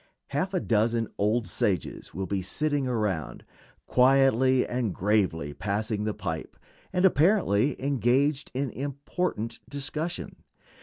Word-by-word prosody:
Half 185 +8 -1
a - - +3
dozen 115 -2 +1
old 105 +1 +1
sages 95 -1 -1
will 95 +1 -4
be 95 +1 -2
sitting 145 +8 -1
around, 100 - -2 0.4
quietly 130 0 +4
and 120 -6 -2
gravely 90 -7 +1
passing 105 +4 -2
the 110 - -1
pipe, 80 -1 -5 0.3
and 180 0 +2
apparently 150 - +3
engaged 135 +2 +1
in 135 0 -1
important 140 -3 -3
discussion. 150 +4 -4
120 Hz, 115 wpm, -27 LUFS, 105-140 Hz, 0.4 s, quietly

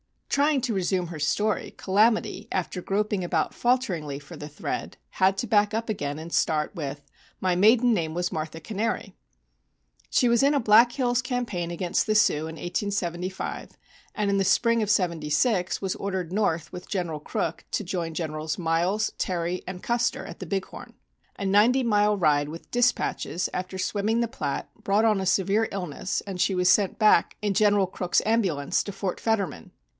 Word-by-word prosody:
Trying 285 -1 +2
to 245 -3 -1
resume 185 -2 0
her 165 -2 -7
story, 210 +8 0
"Calamity," 215 +4 +1
after 180 -1 -2
groping 205 +1 -1
about 175 - 0
falteringly 185 - 0
for 145 0 -11
the 150 - -7
thread, 150 - -5
had 190 +1 +2
to - - -1
back 210 -1 +2
up 225 +1 -2
again 145 -8 -2
and 165 +2 -8
start 150 -1 +1
with 145 -5 -5 0.4
"My 185 -1 +2
maiden 225 +6 +5
name 160 -6 -1
was 175 0 -1
Martha 160 +1 -4
Cannary." 220 +6 -3 1.0
She 245 - +3
was 235 +1 +4
in 280 +2 +4
a 285 - +2
Black 230 +1 +5
Hills 245 -2 +1
campaign 240 -9 -3
against 175 +3 -1
the 215 - +1
Sioux 160 -7 +3
in 160 - -7
1875, 180 0 -3 0.4
and 210 -2 0
in 200 - +2
the 195 - +2
spring 230 +3 +3
of 210 - -1
'76 180 +1 +1
was 190 -2 -2
ordered 190 -4 -3
north 170 -6 0
with 180 - -9
General 175 -6 -2
Crook 155 +2 -3
to - - -1
join 170 -3 -3
Generals 155 -1 -3
Miles, 180 +5 0
Terry 175 0 -1
and 180 0 -7
Custer 240 0 0
at - - -9
the 185 - -7
Big 195 +2 -1
Horn. - - -11 0.4
A 200 - -4
ninety 215 +7 +4
mile 210 -2 +3
ride 150 -5 +2
with 165 +2 -10
dispatches 245 -7 0
after 185 +1 -4
swimming 210 +4 0
the 235 - -1
Platte 140 -9 -4
brought 205 +3 +2
on 215 -3 +3
a 190 - -2
severe 195 +4 +2
illness, 185 -1 -3
and 195 -3 -6
she 190 - +2
was 180 0 +3
sent 200 -1 +3
back 210 -5 +4
in 205 -1 0
General 205 -1 +4
Crook's 180 -1 0
ambulance 190 -11 +1
to 200 - -6
Fort 195 -2 -3
Fetterman. 195 - -2
190 Hz, 180 wpm, -26 LUFS, 170-215 Hz, 1.0 s, maiden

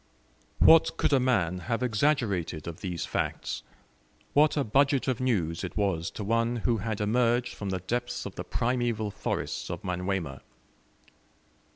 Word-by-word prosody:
What 165 0 +6
could - - +2
a 135 - +5
man 95 -9 +1
have 115 +1 0
exaggerated 105 - 0
of 85 +3 -7
these 90 -4 -3
facts? - - -2 0.7
What 150 +1 +4
a 145 - +2
budget 135 +3 +2
of 130 -2 0
news 95 -11 0
it 90 - -6
was 95 -5 0
to 105 - -3
one 115 +3 +1
who 120 -2 +3
had 110 +1 -3
emerged 120 +3 +1
from 100 - -5
the 95 -1 -2
depths 120 +6 -3
of - - -6
the - - -5
primeval 115 -3 -1
forests - - -3
of - - -5
Manyuema! 90 -6 -2
110 Hz, 155 wpm, -28 LUFS, 95-125 Hz, 0.7 s, What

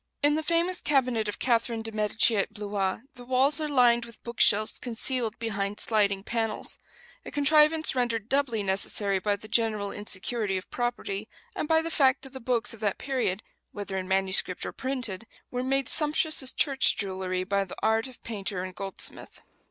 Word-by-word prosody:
In 290 0 +5
the 310 - 0
famous 340 +3 +2
cabinet 255 -6 +1
of 205 - -4
Catherine 230 -2 0
de 225 - -6
Medici 215 +1 +3
at 200 - 0
Blois 205 -2 -2
the 245 - -12
walls 265 +4 +2
are 305 - -2
lined 240 -4 +4
with 235 -1 -12
book 235 0 -8
shelves 215 +1 +4
concealed 240 -1 -1
behind 205 -3 -3
sliding 200 -3 +1
panels 225 -1 -2 0.4
a - - -8
contrivance 305 +2 +4
rendered 235 -4 -1
doubly 255 -6 0
necessary 195 0 0
by 205 +2 0
the 205 +2 -10
general 215 -2 +1
insecurity 205 0 -2
of 185 - -8
property, 240 -4 -3 0.3
and 340 - -3
by 320 0 +3
the 330 - -4
fact 265 -4 +3
that 270 -1 -10
the 265 - -7
books 240 -1 0
of 225 - -11
that 205 -3 -1
period, 250 -8 -2 0.3
whether 200 -1 -5
in 185 -1 -3
manuscript 190 -1 +1
or - - -4
printed, 245 -6 -3 0.2
were 250 - -2
made 270 +1 0
sumptuous 310 0 +3
as 265 0 +2
church 275 -1 +3
jewelry 185 -2 -2
by 200 +1 0
the 190 - -10
art 220 +2 +2
of 255 - -15
painter 200 -4 -4
and 185 0 -6
goldsmith. 195 +1 -5
225 Hz, 185 wpm, -27 LUFS, 200-260 Hz, 0.4 s, In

